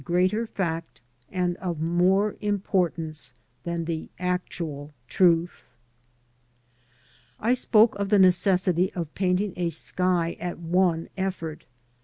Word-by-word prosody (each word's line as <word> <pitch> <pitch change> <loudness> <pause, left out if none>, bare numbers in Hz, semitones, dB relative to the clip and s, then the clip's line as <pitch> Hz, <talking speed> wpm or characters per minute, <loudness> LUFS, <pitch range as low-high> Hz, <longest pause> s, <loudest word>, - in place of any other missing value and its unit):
greater 185 +8 +1
fact 165 -6 -4 0.3
and 180 -2 0
of 175 -4 -4
more 180 +5 +2
importance 170 - -1 0.3
than 170 -1 -2
the 160 -1 -4
actual 170 -5 -3 0.2
truth. 170 +1 +2 1.8
I 235 +3 +2
spoke 230 -3 +4
of 200 -1 -1
the 210 - +5
necessity 185 -1 +3
of 165 -4 -5
painting 185 +1 0
a 175 -1 -1
sky 170 +1 -1
at 175 -1 -4
one 170 0 +1
effort. 170 -4 -4
180 Hz, 110 wpm, -26 LUFS, 165-190 Hz, 1.8 s, the